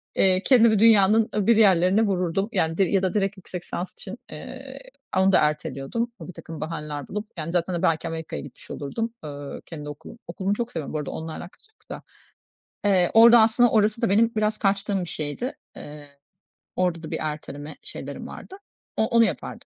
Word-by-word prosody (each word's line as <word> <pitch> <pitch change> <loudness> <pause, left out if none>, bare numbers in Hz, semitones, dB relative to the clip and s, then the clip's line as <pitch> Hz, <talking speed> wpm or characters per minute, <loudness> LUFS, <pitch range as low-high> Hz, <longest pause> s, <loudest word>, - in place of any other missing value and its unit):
eee, 185 0 +3
kendimi 230 -5 +5
dünyanın 220 0 +5
öbür 210 +2 +3
yerlerine 190 -1 +4
vururdum, 195 0 0
yani, 165 -5 0
di 195 - +4
ya 190 +1 +1
da 185 - 0
direkt 200 -1 0
yüksek 180 -1 -8
lisans 180 +1 -5
için, - - -9
eee, - - -9 0.4
onu 190 +1 +4
da - - +5
erteliyordum 150 - -1
birtakım 165 -3 -9
bahaneler 150 -3 -5
bulup. 210 +2 -5
Yani, 160 +1 -4
zaten, 175 +1 0
hani, 170 - -2
belki 165 +1 +1
Amerika'ya 160 - -5
gitmiş - - -12
olurdum, 225 +11 -4
eee, 145 -1 -7
kendi 150 -3 -8
okulum. 145 +9 -10
Okulumu 195 +1 -2
çok 235 +2 -3
seviyorum 155 -4 -5
bu 155 - -1
arada, 150 - -4
onunla 160 0 -6
alakası 190 - -11
yok - - -33
da. - - -7 0.9
Eee, 180 -3 +3
orada 230 +1 +8
aslında 235 +2 +4
orası 215 +1 +2
da 230 - +2
benim 225 +3 +4
biraz 215 0 +1
kaçtığım 195 -1 0
bir - - -3
şeydi. 155 - -4 0.2
Eee, 150 0 -10 0.7
orada 180 -2 0
da 155 - -7
bir - - -2
erteleme 150 -1 -6
şeylerim - - -7
vardı. 385 - -10 0.4
O 220 - +2
onu 230 0 +4
yapardım 185 -8 -4
185 Hz, 185 wpm, -24 LUFS, 160-215 Hz, 0.9 s, orada